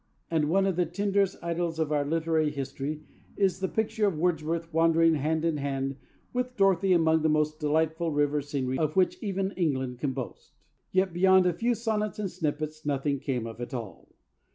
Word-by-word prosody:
And 155 -2 +1
one 195 +3 +3
of 190 -3 0
the 175 -2 +2
tenderest 200 +2 0
idylls 170 -1 -2
of 160 -2 -1
our 145 -1 +2
literary 160 0 +1
history 140 +2 -4 0.3
is 190 -2 +2
the 190 - 0
picture 220 +1 0
of 185 -6 -1
Wordsworth 165 0 -1
wandering 165 0 +4
hand 155 +2 0
in 165 -2 +1
hand 135 -1 -2 0.4
with 250 0 -2
Dorothy 195 -1 +3
among 160 -2 +4
the 160 - +2
most 155 0 +1
delightful 160 +2 0
river 145 0 +1
scenery 135 -2 -2
of 155 -1 0
which 185 -1 +2
even 195 -2 -1
England 130 -9 -1
can 135 -1 -1
boast. 130 -2 -7 0.4
Yet, 190 -1 +1
beyond 190 +1 +5
a 180 - +3
few 235 +7 0
sonnets 215 -2 -2
and 200 -3 -3
snippets, 155 -2 -3
nothing 140 -1 -1
came 125 -4 -2
of 115 +1 -8
it 120 +2 -5
all. 110 -8 -8
160 Hz, 185 wpm, -28 LUFS, 145-185 Hz, 0.4 s, beyond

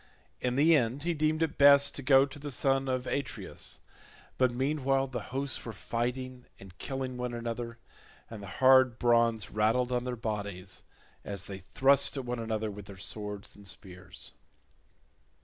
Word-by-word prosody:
In 125 0 -1
the 160 +4 +5
end 130 +1 0
he 170 +1 0
deemed 155 +1 +1
it 160 - -3
best 140 0 +7
to - - -6
go 135 0 +6
to 140 +1 -10
the 145 +1 -6
son 135 0 +1
of 130 -1 -1
Atreus; 140 -1 -4 0.6
but 130 -1 +4
meanwhile 135 +1 +1
the 125 -2 -4
hosts 135 +1 -2
were 115 - -6
fighting 125 +3 -4
and 95 -2 -13
killing 130 -2 -4
one 125 -1 -3
another, 115 0 -4 0.5
and 110 -3 -9
the 100 - -8
hard 130 -2 +6
bronze 115 -3 +2
rattled 115 +4 +2
on 125 -1 0
their 125 -1 -3
bodies, 100 -5 -5 0.4
as 100 -2 -5
they 95 -1 -7
thrust 135 +9 +3
at 135 - -4
one 120 0 -3
another 110 -1 -2
with 100 0 -9
their 100 -1 -10
swords 105 +1 -6
and 100 -1 -12
spears. 95 -1 -6
125 Hz, 165 wpm, -30 LUFS, 110-135 Hz, 0.6 s, best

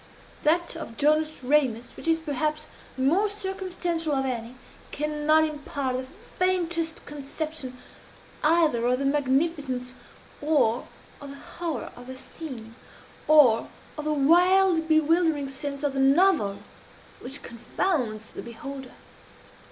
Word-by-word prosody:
That 335 +3 +2
of 230 -8 -8
Jonas 305 0 +1
Ramus, 250 -4 +1
which - - -6
is 325 0 +4
perhaps 305 0 -2 0.3
the 260 - -2
most 400 +9 +2
circumstantial 365 -5 -2
of 270 -1 +1
any, 240 -1 -4 0.4
cannot 300 +1 +2
impart 285 -4 -2
the 255 0 -3 0.3
faintest 345 -3 0
conception 290 -2 -5 0.7
either 305 -6 +3
of 250 +1 +2
the 275 - -2
magnificence 275 -2 0 0.5
or 290 -6 +2 0.3
of 285 - -8
the 275 - -8
horror 320 -1 -5
of 245 0 -12
the 260 0 -7
scene 255 -7 -9 0.5
or 265 -8 +6 0.3
of 300 - -6
the 305 - +1
wild 345 +3 +4
bewildering 315 -2 +3
sense 280 +1 -6
of 285 -2 0
the 270 - -2
novel 275 - +4 0.6
which 265 +3 -7
confounds 235 - -2
the - - -6
beholder. 260 +3 -8
295 Hz, 125 wpm, -26 LUFS, 260-325 Hz, 0.7 s, or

